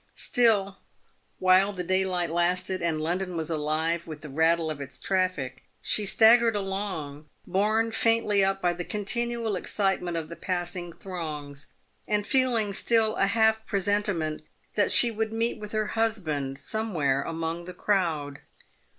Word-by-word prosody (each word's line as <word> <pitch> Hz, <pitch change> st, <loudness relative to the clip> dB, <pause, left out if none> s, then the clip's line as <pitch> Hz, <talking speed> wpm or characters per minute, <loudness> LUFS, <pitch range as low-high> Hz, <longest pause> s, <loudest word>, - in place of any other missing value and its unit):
Still, 205 Hz, -5 st, +2 dB, 0.6 s
while 185 Hz, +2 st, +4 dB
the 180 Hz, -2 st, -4 dB
daylight 185 Hz, -2 st, 0 dB
lasted, 180 Hz, +2 st, 0 dB
and 165 Hz, -2 st, -1 dB
London 175 Hz, +3 st, -2 dB
was 160 Hz, 0 st, -3 dB
alive 160 Hz, +2 st, -1 dB
with 155 Hz, -2 st, -8 dB
the 150 Hz, -, -9 dB
rattle 160 Hz, +2 st, +2 dB
of 145 Hz, -2 st, -6 dB
its 140 Hz, -1 st, -7 dB
traffic, 185 Hz, -9 st, -1 dB, 0.2 s
she 210 Hz, -2 st, +2 dB
staggered 230 Hz, +1 st, +5 dB
along, 190 Hz, -7 st, -4 dB, 0.2 s
borne 215 Hz, +4 st, +1 dB
faintly 225 Hz, -3 st, +3 dB
up 195 Hz, 0 st, 0 dB
by 175 Hz, -1 st, +2 dB
the 175 Hz, 0 st, -5 dB
continual 225 Hz, +2 st, -1 dB
excitement 185 Hz, -2 st, -1 dB
of 160 Hz, -2 st, -4 dB
the 170 Hz, -, -8 dB
passing 175 Hz, 0 st, -3 dB
throngs, 155 Hz, -5 st, -7 dB, 0.4 s
and 210 Hz, -1 st, 0 dB
feeling 240 Hz, -6 st, +2 dB
still 220 Hz, +1 st, +2 dB
a 195 Hz, -, +2 dB
half 220 Hz, +1 st, +2 dB
presentiment 200 Hz, -6 st, 0 dB, 0.3 s
that 205 Hz, -, +1 dB
she 240 Hz, -, +6 dB
would 220 Hz, 0 st, -2 dB
meet 225 Hz, 0 st, -1 dB
with 210 Hz, -1 st, -7 dB
her 215 Hz, -1 st, -1 dB
husband 160 Hz, -12 st, -1 dB
somewhere 150 Hz, -6 st, -1 dB
among 165 Hz, +2 st, -4 dB
the 180 Hz, -, -7 dB
crowd. 160 Hz, -9 st, -1 dB
185 Hz, 145 wpm, -26 LUFS, 165-215 Hz, 0.6 s, she